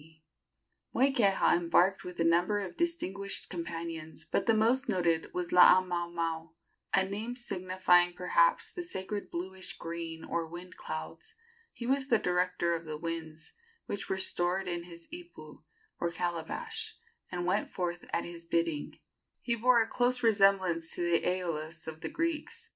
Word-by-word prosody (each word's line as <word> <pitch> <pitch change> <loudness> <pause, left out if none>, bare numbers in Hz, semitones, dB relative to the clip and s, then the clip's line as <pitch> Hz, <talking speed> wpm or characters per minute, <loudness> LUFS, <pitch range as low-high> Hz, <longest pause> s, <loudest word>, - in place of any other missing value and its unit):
Moikeha 240 -10 +4
embarked 175 +3 +3
with 180 -1 -8
a - - +3
number 175 +5 +3
of 190 -3 -5
distinguished 200 - -1
companions, 165 -2 -5
but - - -1
the 225 - +6
most 240 +5 +2
noted 170 -3 +1
was 180 -1 -3
Laamaomao 170 -3 +4 0.4
a 190 - +4
name 215 +5 -4
signifying, 185 -5 +2
perhaps, - - +2
the 355 - -5
sacred 205 - -5
bluish 185 +2 -4
green 165 -1 -5
or 170 -1 -2
wind 175 +2 -9
clouds. 450 +1 -7 0.4
He 235 - -7
was 265 +1 +1
the 235 - +5
director 180 -2 +1
of 165 0 -3
the 155 -2 -5
winds, 160 -1 -5 0.3
which 200 - -4
were 190 - 0
stored 185 0 +1
in 175 -1 -3
his 170 -1 -10
ipu, 350 0 -11 0.4
or 170 - 0
calabash, 175 - -4 0.3
and 175 -1 -2
went 195 +4 +1
forth 175 -1 -4
at - - 0
his 170 -1 -8
bidding. 165 -3 -1 0.4
He 235 - -1
bore 235 0 +4
a - - -8
close 245 +1 +1
resemblance 195 -6 +3
to 175 - -2
the 170 -1 +3
Æolus 165 -3 -2
of 160 0 -7
the - - -3
Greeks. 330 -2 -3
180 Hz, 150 wpm, -31 LUFS, 170-215 Hz, 0.4 s, the